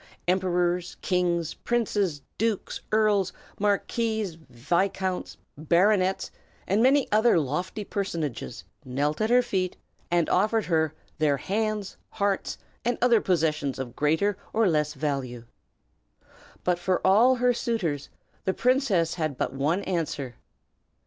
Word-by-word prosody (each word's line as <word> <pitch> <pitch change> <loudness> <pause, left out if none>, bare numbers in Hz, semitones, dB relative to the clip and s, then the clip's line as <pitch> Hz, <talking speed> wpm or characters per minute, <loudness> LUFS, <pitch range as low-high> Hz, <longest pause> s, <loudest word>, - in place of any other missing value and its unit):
Emperors, 180 -1 +1
kings, 175 -3 0
princes, 205 - -1 0.2
dukes, 220 -2 -1
earls, 210 -3 +3 0.3
marquises, 210 0 0 0.2
viscounts, 180 +9 -1 0.2
baronets, 185 +5 +2 0.3
and 200 +4 +2
many 270 +2 +4
other 220 -1 +4
lofty 175 +8 -2
personages 165 - -4 0.2
knelt 145 +6 -1
at 215 - +1
her 250 +1 +5
feet, 190 -6 -2 0.3
and 170 -2 +2
offered 215 +3 +2
her 160 -3 +1 0.2
their 150 -2 +3
hands, 210 +4 -2 0.2
hearts, 200 -2 -1 0.3
and 245 +1 0
other 240 -2 +4
possessions 155 -6 0
of 125 -2 -6
greater 160 +7 +1
or 225 -1 +3
less 150 -2 +1
value. 135 -4 -3 1.2
But 180 -1 +1
for 180 +1 0
all 225 +7 +6
her 250 0 +3
suitors 195 - -2 0.4
the 190 - 0
princess 240 - +2
had 155 -6 -2
but - - -1
one 150 +8 0
answer. 155 -8 -2
185 Hz, 120 wpm, -26 LUFS, 155-215 Hz, 1.2 s, all